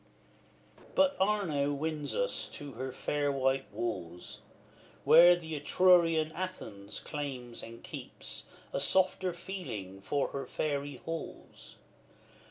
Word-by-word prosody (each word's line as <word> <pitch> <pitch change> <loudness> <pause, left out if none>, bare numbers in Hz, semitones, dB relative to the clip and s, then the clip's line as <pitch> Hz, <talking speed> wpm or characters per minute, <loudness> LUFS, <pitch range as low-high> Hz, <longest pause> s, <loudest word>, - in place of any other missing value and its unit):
XLVIII. - - -20
But 285 0 +4
Arno 180 -8 +2
wins 150 0 -2
us - - -1
to 145 -1 -6
the 130 +2 -5
fair 145 +2 0
white 135 0 0
walls, 90 -7 -4 0.6
Where 175 +2 +9
the 160 -2 -7
Etrurian 165 0 +4
Athens 135 - -5
claims 130 -5 -5
and 115 0 -10
keeps - - -7 0.3
A - - 0
softer 185 +5 +3
feeling 120 - -6
for 140 +8 0
her 140 - -5
fairy 145 -2 -2
halls. 165 0 -7
145 Hz, 115 wpm, -32 LUFS, 130-175 Hz, 0.6 s, Where